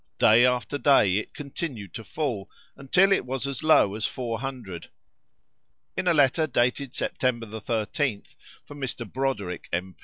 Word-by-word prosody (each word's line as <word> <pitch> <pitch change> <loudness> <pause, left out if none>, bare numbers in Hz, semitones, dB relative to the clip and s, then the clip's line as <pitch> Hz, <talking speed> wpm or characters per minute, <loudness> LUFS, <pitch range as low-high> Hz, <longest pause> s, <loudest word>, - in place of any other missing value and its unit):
Day 115 +3 +6
after 125 +3 -1
day 105 -11 +4
it 105 - -5
continued 135 - -6
to 115 - -6
fall, 125 -8 -3 0.3
until 180 +9 +3
it 195 - +3
was 130 +1 -3
as 140 -2 -3
low 155 -10 +5
as 110 +1 -1
four 115 -3 -4
hundred. 120 -10 -6 1.1
In 185 - -2
a 175 - +5
letter 145 +2 +3
dated 125 +1 0
September 120 -3 -1
13th, 110 +2 -2 0.3
from 145 -1 -11
Mr. 125 -3 -3
Broderick, 105 -8 -3
M. 90 +2 -3
125 Hz, 150 wpm, -26 LUFS, 110-140 Hz, 1.1 s, Day